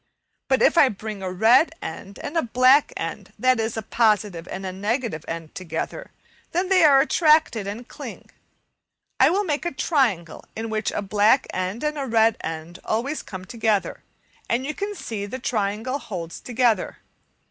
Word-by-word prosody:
But 265 -1 +2
if 340 - +5
I 275 - +7
bring 210 -1 -6
a 185 -1 -3
red 230 - +4
end 195 +5 -8
and 295 - -5
a 330 - +3
black 255 +4 +4
end, - - -6
that 255 +2 +3
is, 225 0 -2
a 220 - -3
positive 205 -7 +1
and 190 0 -6
a 185 - -3
negative 205 - -2
end 165 -1 -6
together, 185 - -5 0.4
then 365 +2 0
they 370 -3 +5
are 280 -3 +7
attracted 305 - +3
and 225 +5 -6
cling. - - -10 0.9
I - - +6
will 395 +4 +1
make 300 -6 -1
a 345 - -2
triangle 220 - 0
(A, - - -13
Fig. - - -29
21) 225 - -4
in - - -5
which 215 0 -1
a - - -2
black 210 +6 +3
end 185 +6 -3
and 300 0 -1
a 275 - -3
red 225 -1 +3
end 165 +2 -6
always 265 +8 -2
come 185 -1 -9
together, 220 -1 -1 0.5
and 245 +3 0
you 305 - -4 0.2
see 215 - -5
the 255 - -5
triangle 225 +2 -2
holds 175 -9 -6
together. 240 -2 0
225 Hz, 180 wpm, -23 LUFS, 195-270 Hz, 0.9 s, I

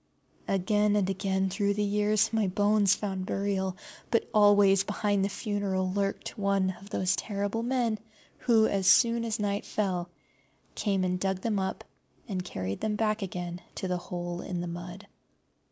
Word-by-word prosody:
Again 210 +2 +2
and 200 -3 +2
again 190 0 0
through 200 +1 0
the 210 - 0
years 210 +2 +2
my 220 -3 +2
bones 205 0 +3
found 190 -3 -4
burial, 190 -2 -1 0.3
but 230 - +1
always 205 -2 +6
behind 205 -1 0
the 200 - +1
funeral 195 -3 -1
lurked 200 0 -2
one 195 -1 +2
of 200 - -13
those 185 -3 +1
terrible 205 +1 -2
men 235 -3 0 0.4
who, 225 -3 +4
as 195 -3 0
soon 230 +4 +5
as 225 -1 -2
night 205 -1 -1
fell, 180 -4 -2 0.6
came 195 -3 0
and 180 0 0
dug 190 0 -1
them 215 -2 0
up 190 0 -3 0.4
and 190 -5 -3
carried 95 - -4
them 215 -1 0
back 215 0 0
again 175 -2 -5
to 190 - -3
the 180 -1 0
hole 175 0 -5
in 180 -2 -4
the 175 - -3
mud. 175 +3 -7
200 Hz, 165 wpm, -29 LUFS, 185-210 Hz, 0.6 s, always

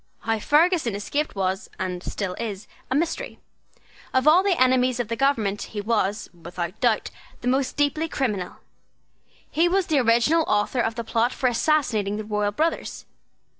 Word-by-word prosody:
How 225 -1 -1
Ferguson 305 - +2
escaped 290 +9 -2
was, 190 +1 -2
and 180 -1 -3
still 190 0 -4
is, 210 -2 -5 0.2
a 260 - 0
mystery. 335 - -2 0.8
Of 260 +2 +3
all 330 +4 +7
the 385 -3 +1
enemies 255 -1 +3
of 235 -3 -2
the 230 - -1
government 225 -7 +1 0.2
he - - 0
was, 210 -1 0
without 175 +3 -6
doubt, 235 -3 +1 0.3
the 245 - -4
most 265 +2 0
deeply 300 +3 +1
criminal. 210 - -2 1.0
He 335 +3 +3
was 380 +1 +2
the 310 -6 +2
original 240 +7 +3
author 210 +4 +1
of 225 -1 0
the 235 - -3
plot 230 +2 +1
for 260 - 0
assassinating 235 -6 +1
the 215 - -4
royal 210 -1 0
brothers. 320 +10 -2
235 Hz, 165 wpm, -24 LUFS, 205-290 Hz, 1.0 s, all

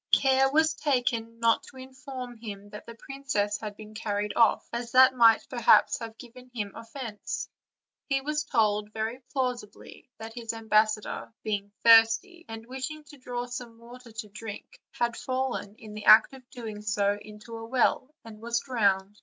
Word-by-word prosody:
Care 270 0 +4
was 315 +2 +3
taken 235 -5 -1
not 230 0 +3
to 265 - -15
inform 260 -1 -8
him 205 -2 -9
that 210 - -10
the 230 - -9
princess 230 -6 -2
had 210 -2 -7
been 215 0 -11
carried 210 -1 -2
off, 230 -2 +3
as 235 0 -4
that 260 0 +7
might 230 -3 +5
perhaps 240 -3 +4
have 225 -1 -8
given 250 +1 -13
him 205 -3 -3
offence; 230 -2 -6 0.6
he 275 -1 +1
was 300 +2 -2
told, 210 -4 +1
very 220 +3 -3
plausibly, 250 -4 -4
that 225 0 -8
his 230 -2 -5
ambassador, 215 -1 0
being 205 -2 -3
thirsty, 230 +11 +5
and 225 0 -8
wishing 265 +5 -6
to 295 0 -15
draw 245 -1 -4
some 245 -2 -8
water 240 +1 -13
to 220 0 -7
drink, 225 - -9
had 235 0 -1
fallen, 255 -5 -3
in 215 -1 -12
the 210 0 -8
act 215 +5 +8
of 255 -2 -14
doing 220 -4 -7
so, 205 -1 0
into 215 +2 -11
a 225 - -7
well, 255 +2 +1 0.2
and 215 -1 -11
was 235 0 0
drowned. 205 -5 0
230 Hz, 170 wpm, -28 LUFS, 215-255 Hz, 0.6 s, act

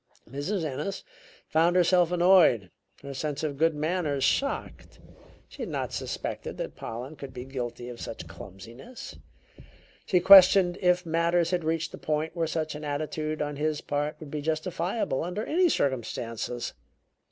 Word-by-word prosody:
Mrs. 155 - -3
Ennis 155 +7 -4 0.4
found 170 +2 +3
herself 180 -1 +4
annoyed, 175 - +5 0.3
her 140 0 -6
sense 150 +2 -3
of 150 -2 -2
good 160 +2 +2
manners 150 -3 -1
shocked. - - -1 0.5
She - - -11
had - - -3
not - - -3
suspected - - -4
that - - -5
Pollen 125 +7 -7
could 140 -3 -9
be 125 0 -6
guilty 120 -2 -5
of 120 -1 -8
such 110 - -7
clumsiness; 105 - -10 0.9
she 180 - +4
questioned 185 -1 +8
if 180 -1 +3
matters 170 +1 +1
had 180 -2 0
reached 165 +1 -1
a - - -8
point 155 +2 -2
where 165 -1 0
such 155 -1 -2
an 150 0 -7
attitude 155 +1 -2
on 145 -1 -4
his 155 0 0
part 145 +1 -2
would 150 -3 -10
be 150 - -3
justifiable 165 - -1
under 180 +6 -3
any 355 +2 +3
circumstances. 120 - -2
155 Hz, 150 wpm, -27 LUFS, 140-175 Hz, 0.9 s, questioned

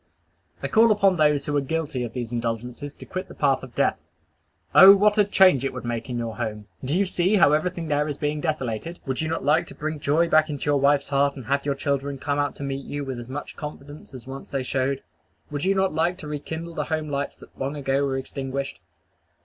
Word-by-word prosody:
I - - 0
call 225 0 +5
upon 195 -3 +4
those 150 -2 +3
who 145 - -2
are 145 - +3
guilty 145 -3 -2
of 115 -2 -5
these 120 -2 -4
indulgences 120 +4 -3
to - - -11
quit 185 0 -5
the - - -12
path 140 -3 +2
of 130 -2 -11
death. - - +1 0.7
O 195 +1 +10
what 210 +1 +3
a - - +7
change 190 -8 +5
it 135 - -2
would 125 -1 -7
make 120 +2 -3
in 125 - -2
your 115 -2 -4
home! 105 -1 -4 0.2
Do 140 +7 0
you 200 - +3
see 185 +2 +1
how 160 -7 +5
everything 170 +2 -1
there 150 0 +1
is 145 -2 -4
being 150 0 -2
desolated! 155 0 -3
Would 130 0 -2
you 160 - -1
not 165 -4 -2
like 150 +2 +3
to - - -10
bring 155 +1 -3
back - - -16
joy 155 +4 +2
to 155 -2 +2
your 145 -1 +2
wife's 140 +1 +3
heart, 140 0 +2
and 130 -4 -9
have 140 +4 0
your 140 - +1
children 140 0 -2
come 145 +2 -1
out 145 0 0
to - - -7
meet 135 0 -4
you 145 0 -4
with 130 -2 -4
as 120 +1 -9
much 145 +2 -6
confidence 145 -1 -9
as 125 - -10
once 135 +1 -8
they 135 -2 -2
showed? 135 +1 -1 0.5
Would 145 +3 -3
you 195 +1 +3
not 190 -2 +1
like 170 +3 +1
to 180 - -8
rekindle 160 +3 -5
the - - -2
home 155 -1 -2
lights 140 0 -3
that - - -16
long 135 +2 -2
ago 140 -1 0
were 135 -1 0
extinguished? 135 0 -4
145 Hz, 240 wpm, -24 LUFS, 135-160 Hz, 0.7 s, O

